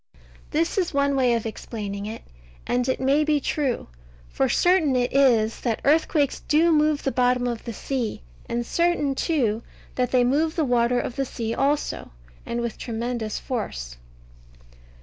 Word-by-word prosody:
This 330 +6 0
is 345 -5 -1
one 280 0 +2
way 250 -3 +3
of 230 - -2
explaining 205 -2 -5
it, 220 +1 -7 0.4
and 245 +1 0
it 260 - 0
may 275 +3 +3
be 300 -1 +2
true. 275 -3 -1 0.4
For - - 0
certain 350 -7 +3
it 245 0 0
is, 235 -5 +3
that 230 -3 -1
earthquakes 295 -1 +2
do 320 +3 +3
move 305 -1 +2
the 270 - 0
bottom 250 -1 +2
of 235 -2 -3
the 235 - -4
sea; 240 - -3 0.3
and 240 0 -1
certain, 340 -4 +1
too, 250 -8 0 0.3
that 250 -1 0
they 250 -1 +3
move 305 +6 +1
the 320 - +1
water 245 -1 +2
of 245 - -4
the 275 - 0
sea 230 -2 -4
also, 285 +4 -1 0.4
and 235 0 -2
with 235 -2 -4
tremendous 230 -2 -3
force. 60 - -4
255 Hz, 165 wpm, -24 LUFS, 235-290 Hz, 0.4 s, way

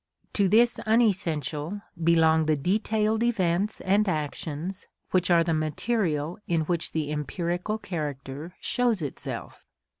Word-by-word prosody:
To 200 -2 +3
this 235 +4 +4
unessential 185 - +1 0.2
belong 160 -1 +4
the 155 -1 +3
detailed 215 +6 +1
events 205 -4 +1
and 200 +2 +2
actions 160 +3 -4 0.2
which 185 -1 +2
are 170 -1 +5
the 165 0 0
material 155 0 -1
in 165 -2 +2
which 165 +1 -1
the 150 -2 -1
empirical 175 +7 -2
character 150 -3 -5
shows 240 -8 +1
itself. 145 - -6
175 Hz, 120 wpm, -27 LUFS, 155-205 Hz, 0.2 s, are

